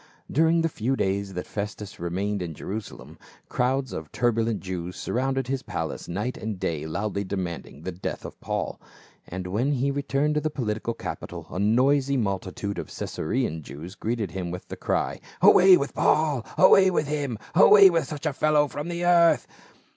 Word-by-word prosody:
"* -, -, -19 dB
During 165 Hz, +3 st, +3 dB
the -, -, +3 dB
few 130 Hz, -3 st, -1 dB
days 95 Hz, -3 st, -1 dB
that 90 Hz, -, -4 dB
Festus 105 Hz, -1 st, -6 dB
remained 95 Hz, +4 st, -2 dB
in 85 Hz, -3 st, -5 dB
Jerusalem, 105 Hz, +6 st, -7 dB, 0.3 s
crowds 130 Hz, +1 st, 0 dB
of 80 Hz, -2 st, -6 dB
turbulent 115 Hz, -2 st, +1 dB
Jews 90 Hz, -1 st, -5 dB
surrounded 135 Hz, +1 st, -1 dB
his 135 Hz, 0 st, -1 dB
palace -, -, -5 dB
night 105 Hz, +9 st, -3 dB
and 110 Hz, -4 st, -5 dB
day 80 Hz, -3 st, -2 dB
loudly 100 Hz, +4 st, -2 dB
demanding 90 Hz, -6 st, -5 dB
the 95 Hz, -, -3 dB
death 90 Hz, +1 st, -5 dB
of -, -, -10 dB
Paul. -, -, -3 dB, 0.5 s
And 90 Hz, +1 st, -5 dB
when 115 Hz, +10 st, 0 dB
he 140 Hz, +1 st, 0 dB
returned 140 Hz, +1 st, 0 dB
to 150 Hz, -, 0 dB
the 155 Hz, -, 0 dB
political 115 Hz, -5 st, -3 dB
capitol -, -, -6 dB
a 90 Hz, -, -4 dB
noisy 135 Hz, +6 st, +3 dB
multitude 100 Hz, -2 st, -3 dB
of 80 Hz, -, -5 dB
Caesarean 80 Hz, -2 st, -3 dB
Jews 80 Hz, +5 st, -9 dB
greeted 110 Hz, -3 st, -3 dB
him 90 Hz, -1 st, -4 dB
with 90 Hz, +1 st, -7 dB
the -, -, -5 dB
cry, -, -, -1 dB, 0.2 s
"Away 185 Hz, 0 st, +8 dB
with 140 Hz, -, -3 dB
Paul! 150 Hz, -6 st, +2 dB
Away 190 Hz, 0 st, +7 dB
with 175 Hz, -4 st, 0 dB
him! 145 Hz, -6 st, -2 dB, 0.2 s
Away 200 Hz, -2 st, +8 dB
with 165 Hz, -1 st, +1 dB
such 150 Hz, 0 st, -7 dB
a 155 Hz, -, 0 dB
fellow 150 Hz, +1 st, +3 dB
from 145 Hz, +2 st, -5 dB
the 175 Hz, 0 st, -2 dB
earth 170 Hz, -1 st, +5 dB
115 Hz, 175 wpm, -25 LUFS, 95-145 Hz, 0.5 s, Away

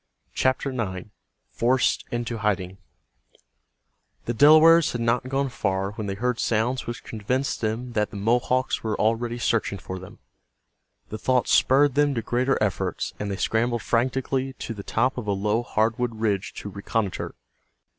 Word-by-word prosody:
CHAPTER 130 Hz, +1 st, 0 dB
IX—FORCED 115 Hz, +3 st, -2 dB
INTO 120 Hz, -1 st, -3 dB
HIDING 95 Hz, -3 st, -1 dB, 1.5 s
The 120 Hz, -, -1 dB
Delawares 155 Hz, +5 st, +6 dB
had 120 Hz, -, -3 dB
not 115 Hz, +2 st, 0 dB
gone 135 Hz, +1 st, 0 dB
far 95 Hz, -4 st, -1 dB
when 105 Hz, 0 st, -5 dB
they 100 Hz, -, -3 dB
heard 125 Hz, +3 st, -1 dB
sounds 120 Hz, +3 st, 0 dB
which 120 Hz, -, -5 dB
convinced 125 Hz, +5 st, -2 dB
them 115 Hz, +3 st, -2 dB
that 105 Hz, -2 st, 0 dB
the 105 Hz, -, -8 dB
Mohawks 125 Hz, +5 st, +1 dB
were 110 Hz, -2 st, -2 dB
already 115 Hz, +2 st, 0 dB
searching 115 Hz, -4 st, 0 dB
for 95 Hz, 0 st, -7 dB
them. 95 Hz, -, -12 dB, 0.9 s
The 110 Hz, -, -6 dB
thought 130 Hz, +2 st, +1 dB
spurred 140 Hz, +1 st, +4 dB
them 145 Hz, 0 st, +2 dB
to 115 Hz, -, -2 dB
greater 125 Hz, +4 st, +1 dB
efforts, 100 Hz, -6 st, -1 dB
and 105 Hz, -, -3 dB
they 100 Hz, -, -3 dB
scrambled 120 Hz, +2 st, 0 dB
frantically 130 Hz, +2 st, 0 dB
to 115 Hz, -, -6 dB
the 105 Hz, -, -7 dB
top 125 Hz, +6 st, 0 dB
of 110 Hz, -, -7 dB
a 100 Hz, -, +1 dB
low 105 Hz, +4 st, 0 dB
hardwood 115 Hz, +1 st, 0 dB
ridge 100 Hz, -3 st, -1 dB
to 105 Hz, -, -6 dB
reconnoiter. 100 Hz, 0 st, -3 dB
115 Hz, 155 wpm, -25 LUFS, 105-130 Hz, 1.5 s, Delawares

